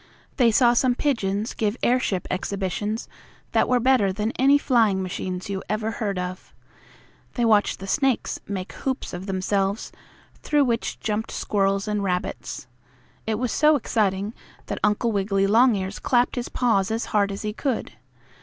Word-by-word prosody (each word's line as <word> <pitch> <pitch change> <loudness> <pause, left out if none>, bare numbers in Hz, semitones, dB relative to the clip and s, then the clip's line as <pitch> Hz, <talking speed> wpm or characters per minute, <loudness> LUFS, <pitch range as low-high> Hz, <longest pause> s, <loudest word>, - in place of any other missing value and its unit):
They 245 -3 +5
saw 240 +1 +5
some 245 0 +2
pigeons 220 -7 -1
give 215 +1 -1
airship 240 -7 +1
exhibitions 200 +3 -2 0.4
that - - +2
were 250 -1 +3
better 245 -5 +3
than 210 +3 -2
any 275 +3 +4
flying 225 -9 +2
machines 185 0 -4
you 195 -1 -3
ever 215 +1 -1
heard 205 -3 -3
of. 180 0 -6 0.8
They 240 - +1
watched 215 -2 +3
the 195 - -8
snakes 270 +4 0
make 190 -2 -5
hoops 265 -1 -3
of 180 +3 -6
themselves, 195 +2 -1 0.5
through 295 -2 +2
which 235 -2 -1
jumped 215 +1 -2
squirrels 195 0 0
and 210 -1 -1
rabbits. 180 -2 -3 0.6
It 220 - +1
was 250 +1 -1
so 305 0 +4
exciting 205 -5 0 0.3
that - - -4
Uncle 210 +3 +2
Wiggily 195 -1 +1
Longears 210 -2 +3
clapped 245 -1 +2
his 245 -1 -3
paws 210 -6 +1
as 225 +1 -1
hard 200 -1 +3
as 195 - -6
he 210 0 -2
could. 255 0 -2
210 Hz, 155 wpm, -24 LUFS, 195-240 Hz, 0.8 s, They